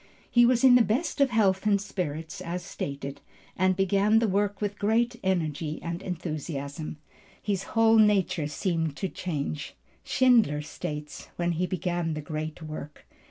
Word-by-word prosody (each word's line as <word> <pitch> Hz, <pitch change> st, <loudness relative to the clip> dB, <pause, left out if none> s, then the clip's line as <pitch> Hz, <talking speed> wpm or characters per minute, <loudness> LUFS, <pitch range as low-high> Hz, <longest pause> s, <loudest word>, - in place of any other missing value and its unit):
He 240 Hz, -1 st, +6 dB
was 245 Hz, 0 st, +2 dB
in 260 Hz, -2 st, +8 dB
the 250 Hz, -, +7 dB
best 255 Hz, +8 st, 0 dB
of 275 Hz, -, +5 dB
health 210 Hz, -3 st, +2 dB
and 200 Hz, -1 st, +4 dB
spirits 180 Hz, -2 st, -4 dB
as 175 Hz, 0 st, -4 dB
stated, 140 Hz, -5 st, -5 dB, 0.3 s
and 185 Hz, +1 st, +2 dB
began 200 Hz, +3 st, +3 dB
the 225 Hz, 0 st, +3 dB
work 200 Hz, 0 st, 0 dB
with 205 Hz, -1 st, -3 dB
great 230 Hz, +4 st, +2 dB
energy 160 Hz, -4 st, -1 dB
and 170 Hz, +2 st, -4 dB
enthusiasm. 155 Hz, -4 st, -5 dB, 0.4 s
His 200 Hz, +1 st, -3 dB
whole 225 Hz, 0 st, +6 dB
nature 195 Hz, -7 st, +3 dB
seemed 160 Hz, 0 st, -1 dB
to 190 Hz, -, -2 dB
change, 150 Hz, -5 st, -4 dB, 0.3 s
Schindler 230 Hz, -, +3 dB
states, 150 Hz, 0 st, -6 dB
when 175 Hz, 0 st, 0 dB
he 175 Hz, +2 st, -1 dB
began 175 Hz, -3 st, -2 dB
the 155 Hz, -, -4 dB
great 155 Hz, +2 st, -5 dB
work. 155 Hz, -1 st, -8 dB
180 Hz, 155 wpm, -27 LUFS, 155-205 Hz, 0.4 s, in